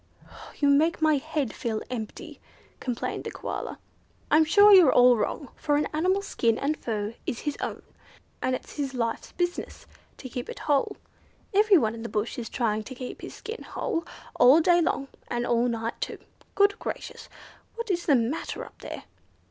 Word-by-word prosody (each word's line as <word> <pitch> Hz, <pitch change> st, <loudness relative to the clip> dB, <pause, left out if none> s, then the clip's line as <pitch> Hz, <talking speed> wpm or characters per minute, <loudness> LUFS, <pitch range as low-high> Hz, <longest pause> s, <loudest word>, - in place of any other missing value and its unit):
"You 285 Hz, -, +2 dB
make 310 Hz, +4 st, +3 dB
my 310 Hz, -2 st, +4 dB
head 295 Hz, -3 st, -2 dB
feel 220 Hz, -2 st, -3 dB
empty," 220 Hz, -4 st, -6 dB, 0.4 s
complained 245 Hz, -3 st, -3 dB
the -, -, -4 dB
Koala. -, -, -5 dB, 0.5 s
"I'm 310 Hz, +2 st, +6 dB
sure 410 Hz, +6 st, +7 dB
you're 355 Hz, -8 st, +8 dB
all 245 Hz, 0 st, +7 dB
wrong; 265 Hz, +5 st, -2 dB
for 295 Hz, -1 st, 0 dB
an 295 Hz, -, +1 dB
animal's 370 Hz, +6 st, +1 dB
skin 230 Hz, -, +1 dB
and 295 Hz, +3 st, 0 dB
fur 215 Hz, -5 st, -3 dB
is 235 Hz, -, -3 dB
his 295 Hz, -2 st, -2 dB
own, -, -, -4 dB, 0.6 s
and 255 Hz, -, +1 dB
it's -, -, -9 dB
his 275 Hz, -2 st, -2 dB
life's 230 Hz, -2 st, -2 dB
business 350 Hz, 0 st, -3 dB, 0.3 s
to 260 Hz, -, -8 dB
keep 245 Hz, 0 st, -6 dB
it -, -, -6 dB
whole. 285 Hz, -2 st, +1 dB, 0.6 s
Everyone 385 Hz, -, +4 dB
in 230 Hz, -, -8 dB
the 230 Hz, -, -5 dB
bush 215 Hz, +3 st, -2 dB
is 230 Hz, -, -5 dB
trying 220 Hz, -4 st, 0 dB
to 260 Hz, -, -8 dB
keep 250 Hz, 0 st, -7 dB
his -, -, -8 dB
skin 450 Hz, +1 st, -7 dB
whole, 345 Hz, -9 st, -3 dB, 0.4 s
all 265 Hz, +6 st, +8 dB
day 345 Hz, +1 st, +4 dB
long, 275 Hz, -4 st, 0 dB, 0.2 s
and 240 Hz, 0 st, -2 dB
all 240 Hz, 0 st, +2 dB
night 230 Hz, -1 st, -3 dB
too. -, -, -3 dB, 0.4 s
Good 405 Hz, 0 st, +3 dB
gracious! -, -, -6 dB, 0.5 s
What 465 Hz, -2 st, -3 dB
is 345 Hz, -1 st, -2 dB
the 290 Hz, -, +6 dB
matter 245 Hz, +6 st, -2 dB
up -, -, -16 dB
there?" -, -, -7 dB
275 Hz, 180 wpm, -27 LUFS, 235-330 Hz, 0.6 s, you're